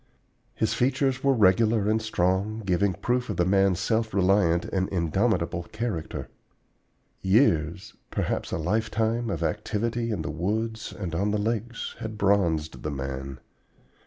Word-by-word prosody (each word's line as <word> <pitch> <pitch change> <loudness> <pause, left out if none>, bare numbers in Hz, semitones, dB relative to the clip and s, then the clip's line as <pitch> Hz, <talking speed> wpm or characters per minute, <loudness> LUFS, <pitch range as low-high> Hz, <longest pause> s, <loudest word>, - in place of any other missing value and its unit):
His 110 - 0
features 130 +1 +1
were 135 -1 +4
regular 105 +1 +4
and 110 +1 +2
strong, 105 +1 0
giving 95 +1 +1
proof 125 0 -1
of 100 - -3
the 85 - +3
man's 95 -1 +3
self 110 -2 0
reliant 90 -3 +3
and 95 -1 -1
indomitable 85 0 0
character. 110 -7 -4 0.9
Years, 95 - +2 0.2
perhaps - - -2
a - - -1
lifetime 110 +6 0
of - - -2
activity 115 +3 -1
in 100 -8 -2
the 75 - -3
woods 110 +7 -2
and 90 -5 -5
on 100 +5 0
the 105 - +1
lakes, 115 +2 -2
had 110 -1 -5
bronzed 90 -6 +1
the 75 - -3
man. 70 -1 -5
100 Hz, 140 wpm, -26 LUFS, 90-110 Hz, 0.9 s, were